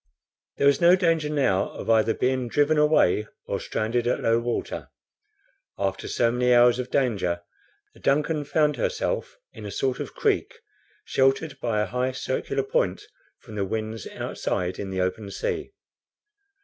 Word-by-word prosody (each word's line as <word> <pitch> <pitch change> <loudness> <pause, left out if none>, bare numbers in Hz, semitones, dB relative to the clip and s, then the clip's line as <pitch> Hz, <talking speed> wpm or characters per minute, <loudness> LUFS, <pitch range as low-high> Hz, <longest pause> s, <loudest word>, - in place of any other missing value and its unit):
There - - +1
was 140 +2 +4
no 175 +1 +7
danger 165 -4 +1
now 135 -11 +1
of - - -7
either 110 0 +3
being 130 -1 0
driven 145 +5 +2
away 150 - +3 0.2
or - - -2
stranded 115 +2 -1
at 125 - +1
low 115 +1 +2
water. 120 0 -3 0.9
After 95 -1 -2
so 115 -1 +2
many 125 +1 +1
hours 120 +1 +5
of 125 0 -3
danger, 100 -11 0 0.5
the - - -18
DUNCAN 150 +1 +1
found 150 -1 +2
herself - - -2 0.2
in 110 - -10
a 105 - -5
sort 130 +5 -1
of - - -6
creek, - - 0 0.5
sheltered 135 +2 +1
by 115 -4 0
a - - +1
high 125 +1 -1
circular 410 - -2
point - - 0 0.4
from 110 - -12
the 105 -2 -1
winds 110 +1 -4
outside 90 0 -3
in 100 - -4
the 95 -1 -2
open 95 +3 -2
sea. 385 - -3
125 Hz, 160 wpm, -25 LUFS, 110-145 Hz, 0.9 s, no